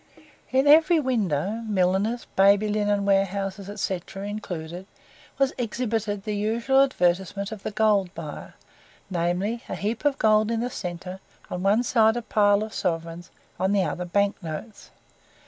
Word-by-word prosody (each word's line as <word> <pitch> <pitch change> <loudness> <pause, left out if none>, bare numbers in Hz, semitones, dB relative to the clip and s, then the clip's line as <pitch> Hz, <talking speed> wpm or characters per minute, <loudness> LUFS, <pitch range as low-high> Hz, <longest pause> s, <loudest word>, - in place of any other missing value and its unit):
In 265 +2 +3
every 320 +3 +6
window 215 - -1
milliners, 200 +4 +1
baby 200 +2 +5
linen 205 -1 0
warehouses, 195 0 0
&c., 190 -2 -1
included 190 -3 -6 0.5
was 275 -1 +2
exhibited 220 -4 -2
the 210 -1 -3
usual 230 +6 +2
advertisement 195 -4 0
of 215 -3 -7
the - - -3
gold 210 -3 +2
buyer - - -8 0.6
namely, 180 +6 -1
a - - -3
heap 215 +5 -3
of 290 -2 +2
gold 215 0 +3
in 230 -1 0
the 245 +1 -2
centre, 180 0 -6 0.3
on 180 - -3
one 205 +5 +3
side 225 -2 +3
a 240 - -4
pile 205 -1 +3
of 215 - -7
sovereigns, 165 0 -3 0.3
on 190 +2 +1
the 200 -2 +3
other 180 0 -3
bank 200 +3 0
notes. 165 +6 -8
205 Hz, 145 wpm, -25 LUFS, 190-225 Hz, 0.6 s, every